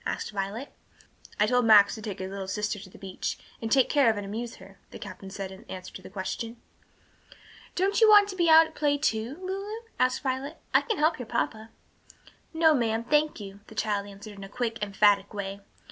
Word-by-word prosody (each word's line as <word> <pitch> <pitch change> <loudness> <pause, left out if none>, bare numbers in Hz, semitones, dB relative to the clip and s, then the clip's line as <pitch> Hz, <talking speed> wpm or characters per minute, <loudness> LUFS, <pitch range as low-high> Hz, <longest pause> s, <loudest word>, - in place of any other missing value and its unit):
asked - - -3
Violet. 205 +6 -4 0.7
"I 210 - +5
told 250 +2 +2
Max 210 -2 +7
to 220 - -7
take 205 -3 -5
his 190 0 -5
little 195 -1 -5
sister 210 +1 -2
to 190 -1 -11
the - - -15
beach, 190 -1 -4 0.2
and 225 -1 -4
take 265 -2 +5
care 280 -5 +4
of 220 - 0
and 205 - -4
amuse 225 +4 -5
her," 195 +1 -15
the - - -10
captain 195 - -9
said 195 -1 -6
in 190 - -12
answer 185 -1 -8
to - - -9
the - - -11
question. 225 +4 -5 1.2
"Don't 390 +4 +1
you 440 - +7
want 415 -1 +8
to 380 - -5
be 345 -2 +2
out 320 0 +9
at 320 - -12
play, 290 -2 +1
too, 240 -1 -1
Lulu?" 395 +4 -4 0.2
asked 255 +3 +1
Violet. 270 +3 -3 0.2
"I - - +6
can 445 -4 -2
help 310 0 +2
your 245 - -6
papa." 225 -2 -2 0.8
"No, 320 -1 +4
ma'am, 230 -4 0
thank 300 +3 +1
you," 200 -1 -9
the 220 - -13
child 205 -2 -1
answered 205 +1 -10
in 195 - -10
a 195 - -9
quick, 230 0 -3
emphatic 205 0 +2
way. 200 0 -5
225 Hz, 215 wpm, -27 LUFS, 200-290 Hz, 1.2 s, out